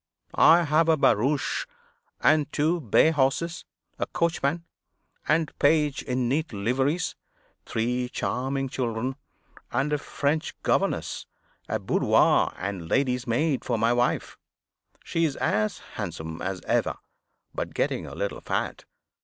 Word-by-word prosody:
I 170 +2 +6
have 155 +1 +3
a 160 - +5
barouche 140 - +1 0.5
and 150 -2 +3
two 160 +4 +1
bay 140 +5 +4
horses, 160 +4 0 0.3
a - - -1
coachman 165 -1 0 0.6
and 155 0 +1
page 150 -1 +3
in 125 -1 -1
neat 155 +6 0
liveries, 130 - 0 0.5
three 125 +2 -1
charming 135 +2 -2
children, 125 -1 -2 0.6
and 135 +5 0
a 150 - +1
French 145 +2 -2
governess, - - 0 0.4
a - - +1
boudoir - - +3
and 95 -3 -4
lady's 125 -2 +1
maid 135 +4 +1
for 120 - -1
my 115 +2 +3
wife. 120 0 0 0.6
She 165 - -1
is 150 -4 +1
as 105 0 0 0.2
handsome 80 0 -5
as 95 -1 -3
ever, - - 0 0.6
but - - -4
getting - - -1
a - - -8
little - - -3
fat. - - -3
135 Hz, 130 wpm, -26 LUFS, 120-155 Hz, 0.6 s, I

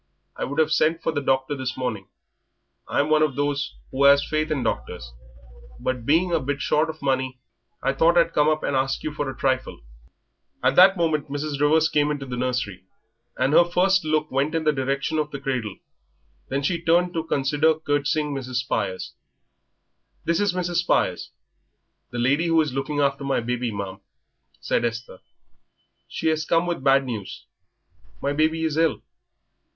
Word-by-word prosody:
I - - -3
would 145 +3 -4
'ave 155 0 +3
sent 160 +1 +2
for - - +1
the 145 -2 -2
doctor 130 +1 0
this 130 -1 -4
morning 110 -7 -3 0.8
I'm 145 +2 0
one 155 0 +4
of 150 -4 +1
those 145 0 -1 0.2
who 140 +1 +3
'as 140 0 +6
faith 155 0 -1
in 145 -5 -1
doctors - - -4 0.7
but 125 -3 -3
being 170 +5 +3
a 165 - +2
bit 140 0 -3
short 155 +3 +1
of 155 -2 -8
money 130 -1 -1 0.4
I 135 - +1
thought 165 +5 +3
I'd 165 -1 +3
come 150 +1 +3
up 155 0 0
and 140 - -1
ask 135 +1 0
you 155 - -3
for 145 -2 -3
a 130 - -7
trifle." 130 -1 -1 0.8
At - - +3
that 190 +1 +7
moment 155 -4 0
Mrs. 145 0 -3
Rivers 155 +2 +4
came 150 -1 +1
into 145 -2 -3
the 125 -2 -5
nursery 120 -7 -3 0.5
and 130 +3 +1
her 170 - +7
first 185 +2 +2
look 155 0 0
went 140 +4 0
in 165 - 0
the 155 - +3
direction 140 +3 -1
of 150 -1 -1
the 140 - -6
cradle, 125 -7 -3 0.7
then 140 +1 -2
she 170 +3 0
turned 175 +2 +2
to 165 -2 -2
consider 150 +1 +1
curtseying 145 0 -1
Mrs. 130 -2 -5
Spires. 105 -6 -2 1.1
"This 170 0 +1
is 205 -3 +1
Mrs. 175 -1 -1
Spires, 175 - +1 0.8
the 120 - -7
lady 140 +8 +2
who 165 -1 +3
is 150 -4 -2
looking 145 +2 -2
after 140 0 +1
my 135 -1 0
baby, 120 0 -2
ma'am," 100 -2 -6 0.6
said 70 - 0
Esther; 115 -4 -4 0.9
"she - - -3
has 155 0 0
come 165 +2 +1
with 175 -6 -3
bad 135 0 +4
news 110 -6 -6 0.7
my 140 - -1
baby 160 +2 +1
is 160 -1 -1
ill." 165 -1 +1
145 Hz, 180 wpm, -24 LUFS, 130-160 Hz, 1.1 s, that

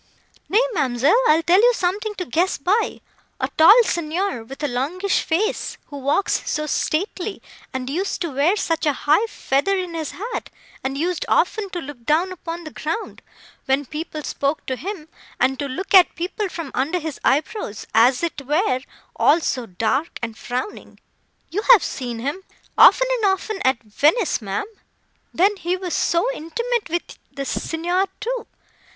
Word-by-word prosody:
"Nay, 435 +5 +4
ma'amselle, 270 - +2
I'll 320 +2 +4
tell 360 +4 +5
you 485 +1 +5
something 410 +4 -1
to 365 - -4
guess 340 +8 +1
by—A 395 +10 -2
tall 410 +10 +8
Signor, 340 - -2
with 270 +6 -10
a - - +2
longish 310 +10 0
face, 375 +7 -1
who 285 - -6
walks 280 +8 +1
so 305 0 -1
stately, 365 +6 -2 0.3
and 260 -1 -4
used 360 +9 -2
to 340 -3 -2
wear 290 +8 +2
such 330 -6 -1
a 295 - +3
high 310 +10 +4
feather 390 +1 0
in 365 -2 -3
his 320 -3 -3
hat; 455 +6 -5 0.3
and 270 +1 -2
used 345 +3 -1
often 400 +3 +1
to 360 -2 -4
look 270 -4 -9
down 320 +8 +2
upon 340 -1 -6
the 310 - -8
ground, 325 +12 -4 0.4
when 270 +1 +1
people 305 +2 -6
spoke 280 +2 -2
to 260 - -2
him; 355 +1 -6 0.3
and 265 0 +2
to 285 - -2
look 360 +11 -5
at 370 -2 +7
people 370 +4 -3
from 330 -6 -6
under 290 +8 0
his 315 -4 -5
eyebrows, 290 - 0
as 245 +6 +4
it 330 -4 -2
were, 295 -3 +1 0.3
all 315 - +4
so 255 -7 -2
dark 225 - -1
and 225 -2 -3
frowning. 250 - -5 0.5
You 400 +5 -1
have 435 - +5
seen 245 -3 -4
him, 285 +10 -3 0.3
often - - +7 0.2
and - - +2
often, 385 +2 -3
at 260 -2 +2
Venice, 295 - +2
ma'am. 195 -2 -3 0.7
Then 395 +4 +2
he 360 +1 -1
was 365 -2 -4
so 340 +5 +2
intimate 470 +5 -2
with 345 +1 -4
the 275 - -5
Signor, 350 +7 -1
too. 475 +1 -3
330 Hz, 165 wpm, -22 LUFS, 275-385 Hz, 0.7 s, tall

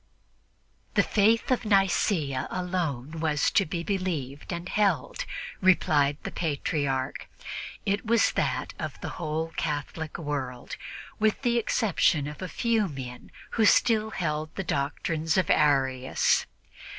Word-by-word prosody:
The - - +5
faith 225 +4 +3
of 255 - +2
Nicea 190 - +2
was - - -4
alone 165 -5 -2 0.3
to 195 - +4
be 170 +1 -3
believed 165 -8 -3
and 170 0 -4
held, 195 -9 0 0.4
replied 145 -6 +4
the - - -4
Patriarch; 140 -4 -2 0.6
it 200 +1 0
was 230 0 +3
that - - -1
of - - -5
the - - -4
whole 160 +1 -2
Catholic 155 +1 -3
world, 135 -6 -4 0.4
with 215 +4 +1
the 240 -1 +3
exception 195 - +2
of 150 +4 -7
a 185 - -3
few 230 -3 +1
men 130 -5 -8 0.2
who 225 - +3
still 220 0 +4
held 155 -6 -3
the 195 - -2
doctrines 155 +2 -1
of 185 -4 +2
Arius. 135 -3 +2
165 Hz, 125 wpm, -27 LUFS, 145-195 Hz, 0.6 s, The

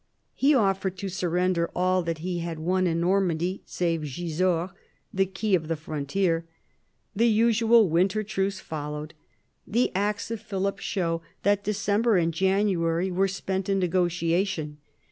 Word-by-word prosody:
He 285 +2 +3
offered 195 -4 +1
to 195 +1 -4
surrender 180 -1 0
all 185 +1 +2
that 165 -1 -3
he 180 -1 -2
had 170 -1 -4
won 180 +3 +1
in 165 -1 0
Normandy 180 -1 +1
save 165 -2 -1
Gisors, 170 +4 -1 0.4
the 195 0 +2
key 195 +2 -2
of 165 -4 +2
the 165 - 0
frontier. 160 +3 -1 0.7
The 230 +4 +3
usual 230 0 +4
winter 185 +6 +2
truce 195 -2 -2
followed. 150 0 -6 0.5
The 240 +4 +1
acts 205 +3 -1
of 225 -2 -4
Philip 195 -2 -2
show 170 -5 -1 0.2
that 205 +1 +2
December 210 +1 +1
and 165 -1 +1
January 190 -1 +1
were 190 +2 +2
spent 190 0 -3
in 195 - +2
negotia 175 -1 +1
tion. 155 -7 -5
185 Hz, 145 wpm, -26 LUFS, 170-200 Hz, 0.7 s, usual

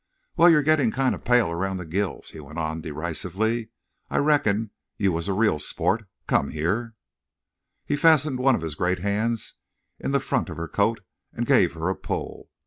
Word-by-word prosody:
"Wal, 175 0 +7
you're 150 -3 +5
gettin' 145 -6 +3
kinda 130 +2 0
pale 120 -7 +2
around 95 +3 -2
the 90 - -6
gills," 95 +3 -3
he - - -10
went 75 +2 -10
on, 80 0 -2
derisively. 90 - -3 0.4
"I - - -1
reckoned 115 -8 +2 0.3
you 100 -2 +2
was 85 +2 -3
a 100 - 0
real 100 -6 +2
sport.... 110 +7 +1 0.2
Come 70 - +1
here." 105 +9 -2 0.9
He 145 - 0
fastened 150 -4 +4
one 130 0 +4
of - - -4
his 80 -2 -3
great 90 +4 0
hands 110 +3 -1 0.5
in - - -3
the 140 0 +2
front 135 - -1
of 80 - -7
her 85 0 -4
coat 105 +5 0 0.3
and - - -3
gave - - +4
her 80 +1 -3
a 95 - 0
pull. - - -5
105 Hz, 185 wpm, -25 LUFS, 85-125 Hz, 0.9 s, Wal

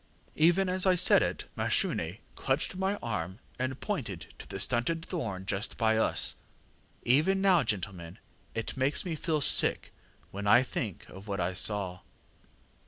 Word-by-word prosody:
_ŌĆÖ 160 +3 +5
ŌĆ£Even - - -5
as 185 +1 -1
I 185 - +4
said 180 - +6
it - - -2
Mashune 85 +4 0 0.2
clutched 135 +7 -2
my 190 +2 -1
arm, 95 -5 -4 0.2
and 130 +1 -3
pointed 115 - -5
to - - -10
the - - -6
stunted 165 +8 +1
thorn 105 - -5
just 100 +1 -3
by 110 -1 +2
us. 110 - +3 0.7
Even 155 +10 +3
now, 190 -3 +4
gentlemen, 95 -6 -5 0.4
it 115 - -4
makes 135 +6 0
me 170 -3 -3
feel 155 0 -1
sick - - +4 0.4
when 100 +1 -5
I 120 +5 +6
think 110 -7 -5
of 95 +3 -12
what 100 -2 -3
I 90 +1 -1
saw. 95 -1 0
120 Hz, 160 wpm, -29 LUFS, 100-165 Hz, 0.7 s, said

